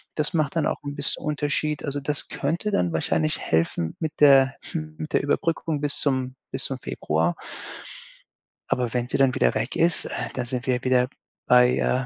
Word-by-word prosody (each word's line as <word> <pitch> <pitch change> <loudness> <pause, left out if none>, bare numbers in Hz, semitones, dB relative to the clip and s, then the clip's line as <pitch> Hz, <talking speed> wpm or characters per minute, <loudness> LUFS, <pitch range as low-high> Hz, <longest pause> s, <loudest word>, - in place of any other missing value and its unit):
Das 150 +3 0
macht 155 -3 0
dann 155 - +2
auch - - -2
'n 145 0 -5
bisschen 145 0 -2
Unterschied. 150 0 -1
Also, 145 -1 -2
das 145 +1 -2
könnte 170 +9 -1
dann 90 - +1
wahrscheinlich 80 -1 0
helfen 80 0 0
mit 160 -2 -4
der 135 -2 +7 0.2
mit 155 -1 -5
der - - +4
Überbrückung 160 +1 0
bis 145 -1 +1
zum 130 -2 0 0.2
bis 130 - -1
zum 135 -1 -4
Februar. 80 - -1 1.3
Aber 125 -2 0
wenn 125 -1 0
sie - - -1
dann 135 -2 +3
wieder - - +3
weg 125 - -2
ist, 170 0 +2
äh, - - -4
dann 125 - -3
sind 125 0 -4
wir 125 -1 +1
wieder 125 -1 +3 0.4
bei, 125 0 +6
äh 130 0 +1
135 Hz, 185 wpm, -25 LUFS, 125-150 Hz, 1.3 s, der